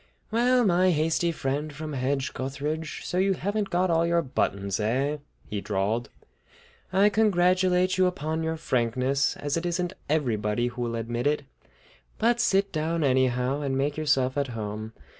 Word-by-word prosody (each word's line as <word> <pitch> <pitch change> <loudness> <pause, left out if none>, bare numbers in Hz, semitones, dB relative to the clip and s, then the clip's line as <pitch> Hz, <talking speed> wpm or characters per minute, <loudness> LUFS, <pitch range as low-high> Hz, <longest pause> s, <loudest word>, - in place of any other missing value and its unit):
"Well, 245 +2 +3
my 185 -1 +4
hasty 165 +1 +1
friend 150 0 -2
from 150 +1 -6
Hedge 135 +1 -1
gutheridge, 145 +4 -4
so 180 - -1
you 195 +1 +3
haven't 205 +2 -2
got 180 0 +1
all 165 0 +3
your 170 0 +2
buttons, 100 - -1
eh?" 130 +8 0 0.3
he 105 -1 -4
drawled. 105 +4 -1 0.8
"I 195 +2 +5
congratulate 185 -3 +3
you 185 - +5
upon 160 -2 -2
your 160 0 -2
frankness, 130 +1 0
as 145 +2 -2
it 165 - -3
isn't 175 +1 -1 0.2
everybody 120 -6 0
who 120 0 -7
will 120 -1 -2
admit 120 +2 -2
it. 145 0 +1 0.7
But 235 +2 +2
sit 195 -3 +2
down, 160 +1 -1
anyhow, 130 0 +1
and 135 -2 -1
make 140 +2 0
yourself 145 -3 +1
at 140 - 0
home. 110 +1 -5
150 Hz, 160 wpm, -26 LUFS, 125-180 Hz, 0.8 s, I